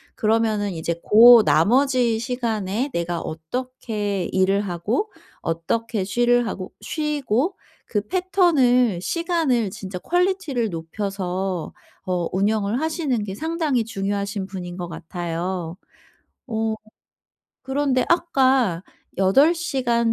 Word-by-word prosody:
그러면은 215 -2 +1
이제 165 0 -2
고 230 +1 +8
나머지 240 - +3
시간에 230 -1 -2
내가 170 0 -2
어떻게 205 +3 -4
일을 190 +1 +2
하고 205 - -2 0.3
어떻게 200 +6 -2
쉬를 240 +4 +2
하고 185 -3 -5
쉬고 300 - -1 0.3
그 210 - 0
패턴을 290 - +3
시간을 325 - 0
진짜 190 -1 -7
퀄리티를 355 - 0
높여서 185 0 -4 0.3
어 180 -3 -1
운영을 205 +3 +1
하시는 315 -8 -1
게 195 -2 -5
상당히 315 -4 0
중요하신 200 -2 -3
분인 180 -2 -7
것 175 -1 -4
같아요. 170 +1 -4 0.7
어 220 -2 -1 0.9
그런데 265 -1 0
아까 265 - +2 0.4
8 270 - +5
시간 240 -8 0
220 Hz, 225 characters per minute, -22 LUFS, 190-260 Hz, 0.9 s, 고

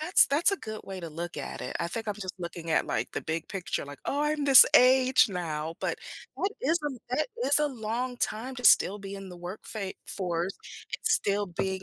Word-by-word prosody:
That's 350 +5 +5
that's 295 +7 +3
a 395 - 0
good 215 -5 -7
way 195 -1 -7
to 170 - -6
look 170 +2 -6
at - - -6
it, - - -4
I 170 - 0
think 225 +3 -5
I'm 210 - -1
just 190 -3 -6
looking 170 -1 -6
at, - - +2
like, - - -2
the - - -3
big 160 +1 -3
picture, 190 -6 -3
like, 145 0 -10
"Oh, 285 +1 -1
I'm 300 -1 0
this 270 -2 +10
age 255 -1 +6
now," 165 -4 -4
but, - - -2 0.4
that 390 - 0
is 325 +6 +2
a 270 -4 -3 0.2
that 305 - 0 0.2
is 285 - +4
a 300 - +3
long 245 +1 -3
time 245 +3 -3
to 250 - -8
still 205 +3 +6
be 195 0 -7
in 195 -1 -8
the 180 - -10
work 175 +4 -7
fa 200 -4 -5
force 180 -1 -2 0.4
and - - -5
still 205 0 +2
being 190 +1 -3
205 Hz, 230 wpm, -28 LUFS, 175-260 Hz, 0.4 s, this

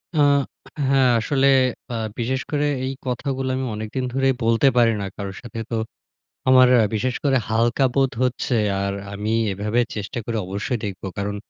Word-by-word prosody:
আ - - -1 0.7
হ্যাঁ, 135 -2 +4
আসলে 135 +4 +2 0.4
আ - - -2 0.2
বিশেষ 130 +3 -1
করে 150 -1 +1 0.2
এই 135 - -2
কথাগুলো 130 +1 -2
আমি 130 0 -2
অনেকদিন 110 +5 -4
ধরেই 135 0 +2
বলতে 115 +4 +3
পারি 115 -1 +5
না - - -3
কারোর 100 -1 -6
সাথে। 120 -2 -8
তো - - 0 0.7
আমার 130 -1 +7 0.3
বিশেষ 125 +4 0
করে 135 -2 +3
হালকা 115 +4 +2
বোধ 135 -2 +3
হচ্ছে 125 0 -1 0.3
আর 100 0 -1 0.2
আমি 105 +2 -3 0.2
এভাবে 105 +5 0
চেষ্টা 105 +2 -5
করে 115 +1 -3
অবশ্যই 105 +7 -2
দেখব 100 -3 -5 0.2
কারণ 100 0 -2
120 Hz, 160 wpm, -22 LUFS, 105-130 Hz, 0.7 s, আমার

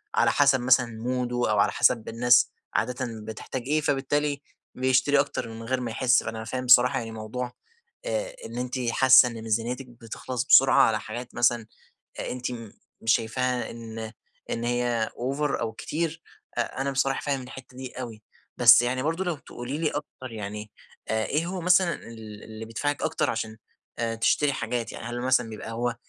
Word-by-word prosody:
على - - +4
حسب 140 -2 +4
مثلًا 125 0 +4 0.2
موده، 125 0 -1 0.2
أو 105 - +2
على - - +3
حسب 110 - +2
الناس 120 +2 +4 0.2
عادةً 125 +2 -1 0.2
بتحتاج 110 +3 -5
إيه، 155 +1 +2
فبالتالي 145 0 0 0.3
بيشتري 130 +2 +3
أكتر 140 -4 -1
من 115 0 -8
غير 130 +2 -1
ما 120 -2 -3
يحس، 125 +2 +3
فأنا 110 0 -5
فاهم 130 +2 -4
بصراحة 125 0 +6
يعني 115 -1 -6
موضوع 115 +3 -5 0.5
آآ - - -2
إن - - -7
إنتِ 125 +1 -3
حاسة 130 -1 +7
إن 115 -1 -7
ميزانيتِك 115 +4 -2
بتخلص 120 +2 -5
بسرعة 135 -1 +7
على 110 -1 +2
حاجات 120 +3 -7
مثلًا 120 -2 +2 0.5
آآ - - -3
أنتِ 125 0 -3 0.5
مش 115 0 +4
شايفاها 125 +2 -1
إن 115 -1 -7 0.4
إن 115 - -2
هي 120 -2 0
over 135 +4 -1
أو 110 - -1
كتير، 160 +5 -3 0.4
أ - - +3 0.2
أنا 140 0 0
بصراحة 135 0 0
فاهم 140 -2 -1
الحتة 130 0 -11
دي 130 -1 -6
أوي، 110 -3 -8 0.3
بس 120 -1 +8
يعني 130 +2 -1
برضو 165 +4 0
لو 175 -3 -1
تقولي 125 +4 -6
لي 160 -2 +1
أكتر، 130 -4 -7
يعني 105 0 -6 0.4
آآ، 110 0 0
إيه 155 +4 0
هو 180 0 -4
مثلًا 180 0 +4
ال 110 -2 -11
اللي 110 0 -8
بيدفعِك 145 +6 -2
أكتر - - 0
عشان 110 -1 -3 0.6
تشتري 145 +2 +3
حاجات، 120 -1 -3
يعني - - -8
هل 120 +1 -4
مثلًا 125 -3 +2
بيبقى 110 +1 -7
هو 120 +1 -1
125 Hz, 175 wpm, -26 LUFS, 115-135 Hz, 0.6 s, بس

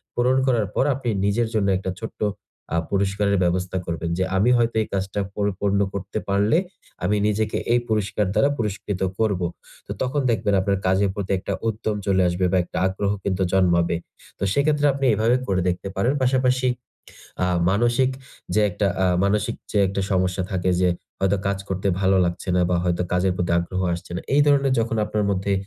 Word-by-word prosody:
পূরণ 125 +2 +2
করার 115 -6 +2
পর - - +3
আপনি 125 -2 -3 0.2
নিজের 110 +3 +1
জন্য 105 -3 +1
একটা 95 0 -3
ছোট্ট 110 - -8 0.5
আ - - +2
পুরস্কারের 100 0 +1
ব্যবস্থা 90 +1 0
করবেন। 85 0 -3
যে 95 - +1
আমি 110 +6 +3
হয়তো 115 -1 +1
এই - - -3
কাজটা 95 +1 -2 0.2
পরিপূর্ণ 100 0 0
করতে 100 +2 -5
পারলে 100 +10 +3 0.5
আমি 100 +4 +2
নিজেকে 105 0 0 0.2
এই 120 - +4
পুরস্কার 105 -1 0
দ্বারা 140 +7 +3
পুরস্কৃত 105 -3 -3 0.2
করব। 100 -5 +1 0.5
তো - - -6
তখন 130 +3 0
দেখবেন 105 -1 0
আপনার 100 0 0
কাজের 95 +1 +2
প্রতি 100 -2 -3
একটা 100 - -4
উদ্যম 110 -1 -2
চলে 95 -1 +2
আসবে 90 +1 0
বা 95 - +3
একটা - - -7
আগ্রহ 100 +1 -1
কিন্তু 95 -1 -1
জন্মাবে। 85 -3 +3 0.4
তো - - -3
সেক্ষেত্রে 145 +1 +2
আপনি 135 0 -2
এভাবে 110 +4 +2
করে 95 -2 +1
দেখতে 90 +2 -3
পারেন। 120 +8 +1
পাশাপাশি 130 0 +2 0.8
আ - - +1 0.2
মানসিক 120 +5 +2 0.4
যে 110 - +4
একটা 100 +3 -1 0.2
আ - - +4 0.2
মানসিক 105 +1 +1 0.2
যে 105 - +2
একটা 100 +1 -2
সমস্যা 90 0 +1
থাকে 95 -1 0
যে 90 - +4 0.3
হয়তো 95 +1 +2
কাজ 100 -1 0
করতে 95 +1 -2
ভালো 95 0 +3
লাগছে 85 +2 -3
না - - +3
বা 90 - +2
হয়তো 90 0 0
কাজের 90 +1 +2
প্রতি 90 -1 -1
আগ্রহ 90 +2 -3
আসছে 85 - -9
না। - - -3
এই 145 - +5
ধরনের 140 -2 +3
যখন 115 0 -1
আপনার 105 -1 -1
মধ্যে 100 +1 -1
100 Hz, 185 wpm, -23 LUFS, 95-110 Hz, 0.8 s, এই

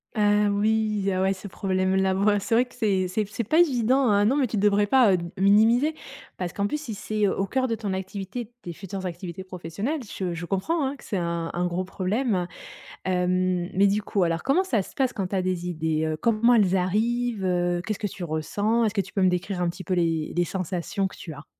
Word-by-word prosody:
Ah 210 -1 +3
oui, 210 0 +1
ah 185 - 0
ouais, 190 +1 +2
ce 190 +1 -9
problème-là. 190 0 0
Bah, 205 +1 +3
c'est 225 +3 0
vrai 245 +2 +4
que 250 - -20
c'est 195 -6 +1
c'est 210 +4 -1
c'est 235 - -3
pas 310 +10 +2
évident, 260 -4 +3
hein, 205 0 +4
non 260 +7 +3
mais 270 -3 +2
tu 220 - -3
devrais 205 0 +3
pas 245 -2 +5
heu, - - +3
d 170 - -5
minimiser, 220 +9 +4 0.4
parce 180 -2 -3
qu'en 200 - -1
plus 300 +8 -2
si 235 -8 -6
c'est 215 0 0
au 195 0 0
coeur 260 +6 0
de 230 - -1
ton 205 -3 -3
activité, 195 +5 -5
de - - -24
tes 175 - -6
futures 190 +2 -7
activités 175 +1 -6
professionnelles, 185 - -4 0.2
je 180 -3 -2
je 170 +1 -5
comprends, 240 - 0
hein, 275 - -4
que - - -17
c'est 200 - -3
un 170 -1 -2
un 175 +1 0
gros 175 +1 -2
problème. 190 +1 -1 0.6
Hem, 180 0 0
mais 195 +2 +4
du 205 +2 +1
coup 200 -2 0
alors 165 -1 -1
comment 335 +8 +2
ça 235 - +1
se - - -13
passe 260 -3 +1
quand 195 -3 -3
tu 195 - -2
as 185 - +1
des 180 -1 -2
idées, 160 -2 -1
heu, 155 0 -1
comment 235 +1 +4
elles 195 -5 +4
arrivent, 220 +4 0
heu, 175 -1 +1
qu'est-ce 215 -2 -3
que 205 - -1
tu 185 -1 -7
ressens? 205 +9 0
Est-ce 215 -1 0
que 205 - +2
tu 195 0 -6
peux 195 - 0
me 185 - +5
décrire 180 +1 -2
un 175 - +1
petit 185 +2 -9
peu 185 - -1
les 165 -3 0
les 175 - +3
sensations 185 +2 -2
que 190 - -8
tu 160 - -8
as? 145 0 -11
195 Hz, 240 wpm, -25 LUFS, 180-220 Hz, 0.6 s, pas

